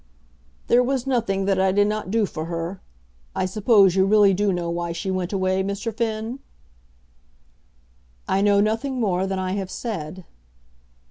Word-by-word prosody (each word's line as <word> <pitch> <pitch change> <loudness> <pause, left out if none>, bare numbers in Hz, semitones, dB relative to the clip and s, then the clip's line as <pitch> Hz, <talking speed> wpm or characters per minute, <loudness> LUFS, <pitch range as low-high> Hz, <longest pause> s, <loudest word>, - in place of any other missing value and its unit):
"There 245 - +4
was 255 0 -1
nothing 225 -7 0
that 195 -1 +1
I 190 0 +3
did 205 +2 +3
not 210 -2 -2
do 220 +1 +2
for 160 -4 -5
her. 170 +3 -5 0.5
I - - 0
suppose 200 -1 +4
you 190 0 +3
really 205 -1 +5
do 205 +1 +1
know 175 -2 -2
why 170 0 -3
she 190 +3 -3
went 185 -1 -2
away, 190 -1 0
Mr. 200 +3 -3
Finn?" 225 +2 -3 1.9
"I 195 - +1
know 200 0 +4
nothing 230 +5 -1
more 190 -4 0
than 190 0 -2
I 185 0 -2
have 195 -1 -3
said." 185 -7 -6
195 Hz, 160 wpm, -23 LUFS, 185-215 Hz, 1.9 s, really